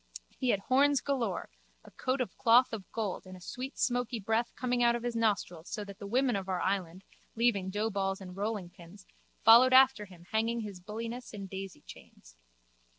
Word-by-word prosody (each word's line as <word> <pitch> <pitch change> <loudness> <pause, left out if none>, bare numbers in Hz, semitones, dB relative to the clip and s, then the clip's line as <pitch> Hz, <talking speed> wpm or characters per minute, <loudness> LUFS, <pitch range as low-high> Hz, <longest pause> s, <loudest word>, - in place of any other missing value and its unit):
He 255 - 0
had 200 -4 +2
horns 275 +4 +3
galore, 235 - -2 0.3
a - - -15
coat 255 +1 -1
of 250 - -4
cloth 240 +2 +4
of 205 -4 -7
gold 210 -4 -3
and 185 0 -10
a - - -13
sweet 255 +9 -7
smoky 245 -2 0
breath 225 +3 0
coming 250 -1 -1
out 235 0 +4
of 240 - -4
his 240 -1 -2
nostrils 200 -7 -1
so 210 - -4
that 200 0 -11
the 200 - -7
women 250 +2 +2
of 195 -1 -4
our 185 -1 0
island, 185 -1 -2 0.3
leaving 220 -5 +1
doughballs 195 -1 -1
and 180 -2 -9
rollingpins, 195 -2 -6 0.4
followed 240 +3 +8
after 260 -4 +6
him 180 -3 -16
hanging 230 +2 0
his 205 -4 -7
bulliness 230 +6 -6
in 200 -1 -6
daisychains. 190 - -10
220 Hz, 180 wpm, -31 LUFS, 195-240 Hz, 0.4 s, followed